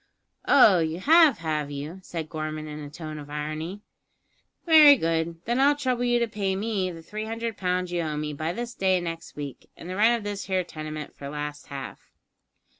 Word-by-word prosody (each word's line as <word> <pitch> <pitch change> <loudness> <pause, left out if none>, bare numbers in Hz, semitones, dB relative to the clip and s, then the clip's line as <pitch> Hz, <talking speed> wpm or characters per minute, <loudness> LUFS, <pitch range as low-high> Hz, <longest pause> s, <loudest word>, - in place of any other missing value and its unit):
"Oh, 220 -10 +7
you 160 +1 -1
have, 315 - +6
have 155 -3 -2
you?" 145 +6 -6
said 165 -4 -5
Gorman 155 0 -5
in 150 0 -7
a 145 -1 -7
tone 155 0 -7
of 145 0 -10
irony. 155 +6 -4 0.8
"Very 310 -4 +9
good; 165 -4 -1
then 240 +3 0
I'll 285 +2 +5
trouble 255 -4 -1
you 240 0 +3
to 235 0 +1
pay 200 -3 -2
me 200 -2 -1
the 165 -2 -9
three 215 +5 -5
hundred 225 0 -4
pounds 180 -1 -1
you 175 -1 0
owe 155 -2 -3
me 150 0 -3
by 155 +3 -2
this 235 +4 -5
day 190 -4 +2
next 165 -1 -6
week, 145 -3 -8
and - - -10
the 185 - -4
rent 225 +4 +4
of 225 - -8
this 205 -1 -4
here 185 -1 0
tenement 155 -2 -7
for 140 - -8
last 150 -1 -6
half." 135 -1 -7
175 Hz, 200 wpm, -26 LUFS, 155-220 Hz, 0.8 s, Very